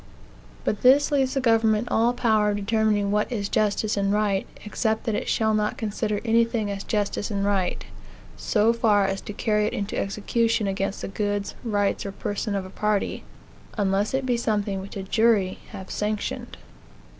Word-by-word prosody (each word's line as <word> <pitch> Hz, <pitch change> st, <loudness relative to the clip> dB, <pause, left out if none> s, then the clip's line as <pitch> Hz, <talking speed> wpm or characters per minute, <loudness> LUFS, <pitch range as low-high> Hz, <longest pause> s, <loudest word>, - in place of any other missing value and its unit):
But 210 Hz, -, -1 dB
this 280 Hz, +4 st, +5 dB
leaves 270 Hz, -1 st, +1 dB
the -, -, +2 dB
government 225 Hz, -1 st, +3 dB
all 230 Hz, +2 st, +3 dB
power 220 Hz, -4 st, +2 dB
of 205 Hz, -, 0 dB
determining 205 Hz, -1 st, +1 dB
what 210 Hz, +4 st, 0 dB
is 205 Hz, -4 st, -2 dB
justice 215 Hz, 0 st, +1 dB
and 200 Hz, -1 st, +1 dB
right, 205 Hz, -2 st, +1 dB, 0.2 s
except 220 Hz, +1 st, -1 dB
that 225 Hz, -, -1 dB
it -, -, -2 dB
shall 220 Hz, -1 st, +2 dB
not 210 Hz, 0 st, 0 dB
consider 210 Hz, -1 st, -2 dB
anything 230 Hz, -2 st, +2 dB
as 195 Hz, 0 st, -4 dB
justice 205 Hz, -1 st, -1 dB
and 200 Hz, -2 st, -1 dB
right 195 Hz, -3 st, 0 dB, 0.5 s
so 220 Hz, +1 st, +2 dB
far 210 Hz, -4 st, +3 dB
as 195 Hz, 0 st, -2 dB
to -, -, -7 dB
carry 210 Hz, 0 st, +1 dB
it -, -, -3 dB
into 200 Hz, 0 st, -3 dB
execution 215 Hz, +2 st, 0 dB
against 195 Hz, 0 st, -2 dB
the -, -, -2 dB
goods, 205 Hz, 0 st, -2 dB
rights, 205 Hz, -4 st, 0 dB
or 200 Hz, -, -5 dB
person 205 Hz, +1 st, -3 dB
of 195 Hz, -1 st, -2 dB
a 185 Hz, -, -10 dB
party 210 Hz, 0 st, -1 dB, 0.5 s
unless 200 Hz, +3 st, +1 dB
it 265 Hz, 0 st, -1 dB
be 245 Hz, -2 st, +1 dB
something 205 Hz, -4 st, -1 dB
which 200 Hz, +1 st, -8 dB
a 195 Hz, -, -4 dB
jury 205 Hz, -2 st, +2 dB
have 190 Hz, -, -9 dB
sanctioned. 210 Hz, 0 st, -3 dB
210 Hz, 180 wpm, -25 LUFS, 200-225 Hz, 0.5 s, this